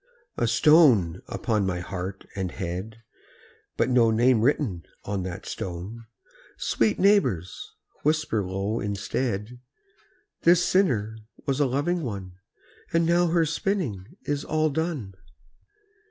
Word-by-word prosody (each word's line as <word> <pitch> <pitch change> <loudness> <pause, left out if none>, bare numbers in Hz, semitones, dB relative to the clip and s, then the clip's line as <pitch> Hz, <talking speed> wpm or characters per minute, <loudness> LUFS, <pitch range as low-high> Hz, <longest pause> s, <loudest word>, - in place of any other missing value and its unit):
A - - 0
stone 125 - +5
upon 110 -3 -1
my 90 -2 -1
heart 95 +2 -6
and 95 -2 -2
head, 95 +5 -5 0.7
But - - +2
no 120 -2 +5
name 115 +1 +3
written 115 - +1 0.2
on 100 -1 -2
the 90 +1 -5
stone! 95 +6 -6 0.5
Sweet 110 -2 +1
neighbours, 130 - +1 0.3
whisper 150 -8 +1
low 95 +4 -2
instead, 105 +3 -3 0.8
"This 175 +1 +5
sinner 110 - +1 0.3
was 135 0 0
a 145 - +3
loving 150 +7 0
one, 100 - -5 0.6
And 165 0 +2
now 175 +1 +3
her 165 0 +2
spinning 155 - -2
is 145 -1 -2
all 155 0 +1
done." 145 - -3
115 Hz, 120 wpm, -26 LUFS, 95-155 Hz, 0.8 s, stone